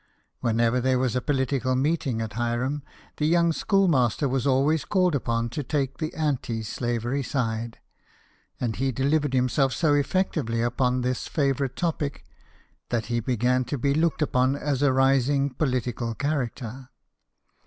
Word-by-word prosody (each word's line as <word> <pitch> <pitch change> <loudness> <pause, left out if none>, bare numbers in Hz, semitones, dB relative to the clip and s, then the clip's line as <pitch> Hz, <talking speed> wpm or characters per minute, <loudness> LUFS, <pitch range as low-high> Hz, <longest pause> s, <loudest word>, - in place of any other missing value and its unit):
Whenever 115 +1 +1
there 130 +1 +2
was 125 -2 0
a 125 - +1
political 130 -1 0
meeting 135 -4 0
at 110 -2 -6
Hiram, 120 +5 -1 0.4
the 150 - +1
young 170 0 +3
schoolmaster 155 - +2
was 130 0 0
always 140 +3 +2
called 180 -3 +2
upon 115 -4 0
to 120 - -4
take 135 -1 -2
the 155 -1 -2
anti 135 -7 -1
slavery 120 +4 -2
side; 115 -3 -2 0.8
and 115 -4 -2
he 135 +1 0
delivered 140 +2 +1
himself 130 +1 +2
so 155 -3 +2
effectively 145 -6 0
upon 125 +2 +1
this 125 0 -2
favourite 135 -3 0
topic 150 - -2 0.6
that 115 -2 -1
he 120 - +2
began 125 +2 +1
to 135 +4 -3
be 140 +3 +1
looked 160 0 +1
upon 130 -1 +2
as 140 -2 -2
a 145 -2 +4
rising 135 +1 +2
political 125 -4 -1
character. 130 -3 -3
130 Hz, 145 wpm, -25 LUFS, 120-145 Hz, 0.8 s, a